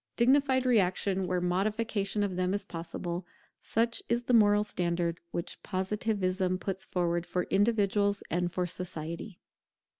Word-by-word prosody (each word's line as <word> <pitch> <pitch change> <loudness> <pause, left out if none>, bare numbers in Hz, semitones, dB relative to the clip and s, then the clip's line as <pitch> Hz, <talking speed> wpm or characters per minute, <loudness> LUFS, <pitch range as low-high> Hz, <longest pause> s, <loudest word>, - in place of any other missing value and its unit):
Dignified 260 +1 +3
reaction 195 -4 +2
where 180 0 0
modification 205 +3 0
of 195 -3 -2
them 185 +1 0
is 205 - -3
possible; 170 +1 -5 0.4
such 230 +1 +1
is 235 +1 +1
the 245 - 0
moral 210 -2 +5
standard 170 -4 -1
which 170 - -5
Positivism 190 -1 -1
puts 190 0 -3
forward 175 -1 0
for 180 - -1
individuals 205 -1 +2
and 175 +1 0
for 180 0 -1
society. 170 +1 -5
190 Hz, 130 wpm, -30 LUFS, 180-210 Hz, 0.4 s, moral